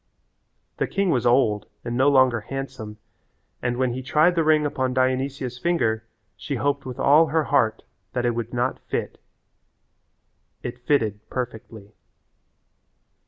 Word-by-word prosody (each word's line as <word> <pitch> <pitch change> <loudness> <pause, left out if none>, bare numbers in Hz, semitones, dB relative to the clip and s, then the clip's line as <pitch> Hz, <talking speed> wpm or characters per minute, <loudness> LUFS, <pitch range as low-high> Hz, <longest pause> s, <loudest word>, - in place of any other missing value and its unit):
The - - 0
king 195 -3 0
was 125 -4 +1
old 120 -4 +2 0.2
and 120 0 -3
no 135 +3 +4
longer 130 -4 +4
handsome, 130 -3 -6 0.6
and 120 0 -1
when 130 -1 +1
he 130 - -4
tried 155 +7 +3
the 165 -2 +1
ring 155 -1 +3
upon 130 -3 -1
Dionysia's 130 -1 -1
finger 115 -9 0 0.3
she 140 - -4
hoped 140 +1 -1
with 125 - -6
all 155 +3 +5
her 155 +2 +1
heart 110 -6 +1 0.3
that 125 -1 -1
it 120 - +2
would 115 0 -4
not 125 +1 -1
fit. - - -4 1.4
It 120 +1 -5
fitted 110 -8 +2
perfectly. 110 -4 -6
130 Hz, 140 wpm, -24 LUFS, 120-140 Hz, 1.4 s, all